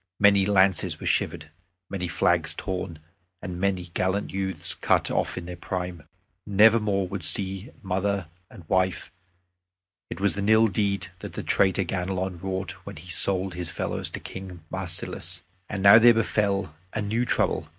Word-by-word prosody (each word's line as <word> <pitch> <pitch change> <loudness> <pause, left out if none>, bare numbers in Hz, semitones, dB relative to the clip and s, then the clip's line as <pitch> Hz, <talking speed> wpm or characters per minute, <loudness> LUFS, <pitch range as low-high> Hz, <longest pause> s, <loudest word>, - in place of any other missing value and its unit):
Many 100 -1 +5
lances 95 -3 +2
were - - -8
shivered, 80 0 -1 0.4
many 90 -2 -4
flags 85 -2 +1
torn, 90 -3 -4 0.4
and 90 -1 -6
many 90 -3 -1
gallant 95 +2 -1
youths 95 -4 0
cut - - +1
off - - -1
in - - -5
their 90 0 -6
prime. 90 -3 -5 0.4
Never 105 +3 +5
more 100 -3 0
would 95 0 -5
they - - +3
see 95 +3 +3
mother 95 0 -1 0.2
and 85 -4 -14
wife. 95 -1 0 1.0
It - - -6
was 100 0 +1
an 100 +1 -1
ill 110 0 +5
deed 100 -2 -1
that - - -8
the - - -5
traitor 95 0 +2
Ganelon 90 0 -3
wrought 95 -1 -3
when 100 0 -9
he 85 +3 -9
sold 95 +4 +1
his 90 -1 -5
fellows - - -3
to - - -6
King 95 -3 -9
Marsilas! 95 -2 -3 0.3
And 100 -2 -4
now 100 +3 +9
there 120 0 +7
befell 100 -6 0 0.2
a 110 - -2
new 110 +4 0
trouble. 120 - 0
95 Hz, 165 wpm, -26 LUFS, 90-100 Hz, 1.0 s, now